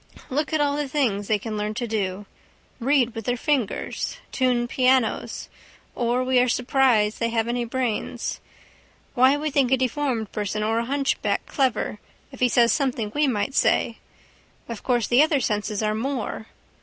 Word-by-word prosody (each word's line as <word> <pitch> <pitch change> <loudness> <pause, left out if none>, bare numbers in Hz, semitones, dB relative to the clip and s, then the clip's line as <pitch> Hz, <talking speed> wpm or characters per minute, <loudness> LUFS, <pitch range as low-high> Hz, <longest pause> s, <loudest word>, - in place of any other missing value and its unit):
Look 290 +3 -1
at 315 - +1
all 290 -1 +1
the 295 -1 -1
things 235 -8 0
they 215 - +2
can 215 +1 -5
learn 210 +1 -2
to 240 +1 -2
do. 205 -3 -2 0.5
Read 255 -2 +2
with 225 -3 -6
their 245 0 0
fingers. 275 - -1
Tune 250 -2 +1
pianos. 255 -1 +1 0.5
Or 245 +1 0
we 255 0 +3
are 250 0 +3
surprised 245 -4 +2
they 230 - 0
have 225 -1 0
any 240 0 -1
brains. 235 -2 -2 0.7
Why 260 +2 +5
we 305 +1 -2
think 270 -3 +2
a 265 - +5
deformed 255 -4 -1
person 210 0 -2
or 225 +1 +1
a 235 - -2
hunchback 275 +2 0
clever 250 -6 -1 0.3
if 265 - -12
he 250 - +3
says 235 -1 +4
something 245 -7 -1
we 295 0 +2
might 245 +1 -1
say. - - +2 0.7
Of 230 -3 -6
course 240 -4 +1
the 245 +3 +5
other 305 -2 +3
senses 210 -2 -1
are 215 0 +1
more. 225 -1 -3
245 Hz, 170 wpm, -24 LUFS, 220-270 Hz, 0.7 s, Why